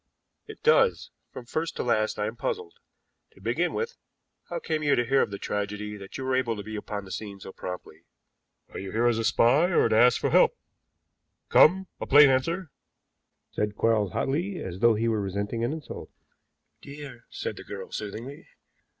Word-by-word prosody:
"It - - -11
does. 470 0 +3 0.2
From 125 - -9
first 160 +6 -3
to - - -2
last 110 -3 +1
I 105 - -1
am 110 +2 -4
puzzled. 410 - -3 0.6
To - - -20
begin - - 0
with, 465 +1 -3 0.5
how - - -3
came 155 - -2
you 145 -1 +3
to 120 - +1
hear 135 +2 +3
of - - 0
the 100 - -5
tragedy 105 +1 -3
that 100 -2 -9
you 135 - -5
were 130 0 0
able 125 -3 0
to 105 - -6
be 110 +1 -7
upon 105 -1 -5
the 95 - -11
scene 100 -2 -6
so 95 - -9
promptly?" 90 0 -8 0.7
"Are - - -6
you 95 0 -6
here 115 +2 +1
as 120 -2 +3
a - - -1
spy 125 +8 +4
or 170 - +4
to 110 - +2
ask 120 +2 +5
for - - 0
help? - - +5 0.9
Come, 190 +4 +6
a - - -5
plain 145 0 +8
answer," 165 +6 -1 0.8
said 105 0 -2
Quarles 105 -5 +1
hotly, 175 +8 -1
as 95 - -6
though 115 0 +5
he 115 +2 0
were 110 -2 +1
resenting 100 +4 -3
an 120 - 0
insult. 155 -1 -7 0.7
"Dear!" 140 -4 -10
said - - -4
the - - -10
girl - - -8
soothingly. 115 +6 -6
120 Hz, 195 wpm, -27 LUFS, 105-145 Hz, 0.9 s, plain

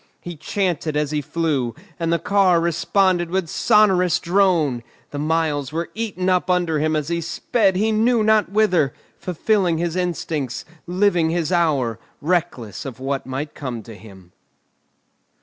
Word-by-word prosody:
He 175 -1 -8
chanted 165 -2 -2
as 150 -1 0
he 150 -1 0
flew, 145 -6 -1 0.2
and 165 -1 0
the 170 - +3
car 190 -2 +3
responded 175 +1 +1
with 185 -1 -1
sonorous 190 -2 +3
drone; 170 -8 +2 0.3
the 145 - -5
miles 150 -3 0
were 165 +2 -3
eaten 210 -5 -3
up 185 0 +1
under 175 -4 +1
him 155 +1 +1
as 150 0 -2
he 170 0 -1
sped 190 +4 0
he 215 +4 +1
knew 225 +1 +2
not 215 0 +3
whither, 185 -9 +2 0.2
fulfilling 180 -1 0
his 170 0 -2
instincts, 165 -7 -3 0.2
living 180 -2 +2
his 165 0 -1
hour, 145 - +1 0.2
reckless 160 - -2
of 130 -4 -8
what 135 0 -3
might 135 +3 -4
come 125 -5 -6
to 115 - -11
him. 95 -4 -15
170 Hz, 150 wpm, -21 LUFS, 145-185 Hz, 0.3 s, the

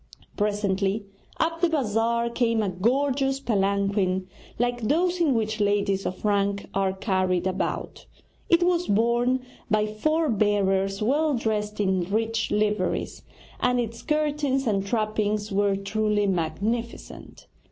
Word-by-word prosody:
Presently 205 0 0 0.3
up 330 +1 0
the 350 - +4
bazaar 235 -5 +1
came 230 -2 +1
a 200 - 0
gorgeous 270 +7 +1
palanquin 200 -4 0 0.3
like 245 +1 0
those 345 +9 +1
in 295 -6 +3
which 220 -1 -1
ladies 200 -1 +1
of 185 - -6
rank 200 -1 +1
are 195 -1 +1
carried 185 -2 0
about. 185 0 -3 0.4
It 340 +1 +5
was 355 0 +1
borne 235 +4 +2 0.3
by 210 0 +2
four 310 +10 0
bearers 195 -3 +1
well 290 +5 +2
dressed 210 -3 -2
in 190 -3 +1
rich 225 +1 0
liveries, 210 0 -1 0.4
and 250 0 +2
its 230 -1 -3
curtains 295 -3 0
and 200 -4 +1
trappings 215 0 -1
were 200 0 +2
truly 210 +1 0
magnificent. 200 +7 -3
215 Hz, 125 wpm, -25 LUFS, 200-245 Hz, 0.4 s, It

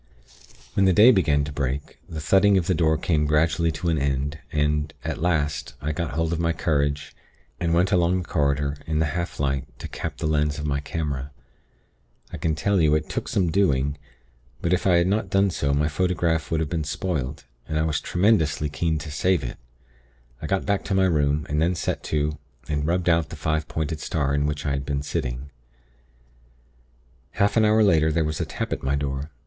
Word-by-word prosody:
"When 95 - +3
the 95 - +4
day 110 +7 +8
began 75 - +2
to 70 - -5
break, 70 0 -3
the 80 - -5
thudding 95 +6 +4
of 90 - +1
the 95 - +2
door 80 -2 +2
came 75 -2 +1
gradually 80 +2 +2
to 85 +3 -2
an 80 -3 +1
end, 70 +2 -1
and, 75 0 0
at - - -3
last, 75 -4 -1
I 75 +3 -2
got 80 0 -3
hold 80 +1 0
of 85 - -2
my 85 0 +1
courage, 70 -2 -1 0.4
and 85 -2 0
went 90 +4 +2
along 90 -1 +3
the 90 - -4
corridor 70 -2 0
in 80 -1 -1
the 80 - +2
half 85 -1 -4
light 70 -2 0
to - - -7
cap - - -5
the - - -4
lens 75 -1 +1
of 75 - -4
my 70 -1 0
camera. 70 -2 -3 1.0
I - - -4
can 80 0 0
tell 100 +5 +1
you, 75 -1 +4
it 75 - -2
took - - -3
some 90 -4 +1
doing; 70 -7 +2 0.6
but 85 - 0
if 90 - +1
I 90 - +5
had 85 0 +4
not 100 +1 0
done 95 +1 +3
so 70 -4 -1
my 75 +2 +2
photograph 85 0 0
would 80 -1 0
have 80 - -1
been 80 -3 -1
spoilt, 75 -4 -3 0.2
and 80 - -2
I 80 - +2
was 80 -2 0
tremendously 85 -6 +2
keen 80 +3 -1
to 75 0 -6
save 90 +4 +1
it. - - -5 0.8
I 75 - -4
got 95 +2 0
back 100 -1 0
to 95 - -1
my 95 0 +4
room, 75 -3 +1
and 75 +2 0
then 85 +2 +2
set - - -2
to 75 0 -1 0.3
and 75 0 -1
rubbed 90 +1 0
out 80 -3 +3
the - - -7
five 80 0 -1
pointed 80 0 -3
star 70 -3 -1
in 70 0 +1
which 75 0 -3
I 70 - 0
had 70 0 -1
been 70 0 -2
sitting. 65 -1 -4 1.8
"Half 100 0 +1
an 110 -1 +4
hour 110 +1 +4
later 80 -6 +4
there 80 0 +1
was 75 -1 -2
a - - -1
tap - - -3
at - - -4
my 65 +1 0
door. 70 +1 -3
80 Hz, 210 wpm, -24 LUFS, 75-85 Hz, 1.8 s, day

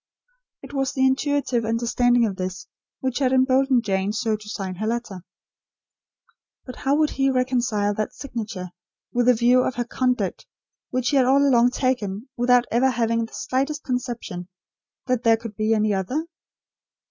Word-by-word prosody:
It - - -11
was 270 -2 -1
the 265 -1 +2
intuitive 265 -2 +1
understanding 235 +1 +2
of 200 -3 -2
this, 185 +2 -5 0.4
which 260 -1 -1
had 260 -2 +2
emboldened 260 -1 +3
Jane 195 -1 0
so 220 -1 0
to 210 0 -10
sign 195 -3 -4
her 215 +3 -2
letter. 225 -6 -3 1.4
But 255 - -9
how 275 0 +1
would 305 0 +2
he 270 0 +1
reconcile 245 -5 +1
that 215 +1 -2
signature 220 -9 -6 0.4
with 245 0 +1
the 250 - +6
view 245 +2 +4
of 250 - -1
her 240 - -2
conduct 250 +1 -1 0.4
which 255 -1 0
he 285 - +2
had 255 -2 +4
all 280 +2 +4
along 245 -2 +5
taken, 250 -3 -2
without 245 0 +3
ever 250 +3 +3
having 230 -2 0
the - - -21
slightest 275 +4 -2
conception 240 -8 -4 0.6
that 255 -2 0
there 230 -2 +4
could 225 -2 -8
be 215 +1 0
any 215 -1 +1
other? 225 - -2
245 Hz, 165 wpm, -23 LUFS, 215-260 Hz, 1.4 s, the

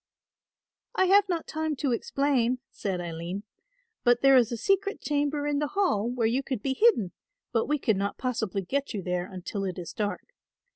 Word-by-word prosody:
"I 375 - +4
have 395 +1 +5
not 340 -3 -1
time 315 -1 -2
to 275 -1 -1
explain," 255 0 +1
said 190 -3 -3
Aline, 175 +3 -5 0.6
"but 240 0 +4
there 270 0 +7
is 245 -3 +4
a 235 - -2
secret 395 - +1
chamber 290 0 0
in 290 -1 +1
the 295 - 0
Hall 235 - +2
where 245 -2 0
you 240 +4 +2
could 260 -5 -4
be 270 - +1
hidden, 265 - +3 0.4
but 225 -2 +1
we 300 - +2
could 220 -7 +1
not 200 +1 -2
possibly 220 -6 -2
get 275 +5 -2
you 195 - -3
there 180 +1 -2
until 190 +2 -4
it 185 -2 -3
is 170 -2 -6
dark. 210 - -3
245 Hz, 190 wpm, -28 LUFS, 200-290 Hz, 0.6 s, there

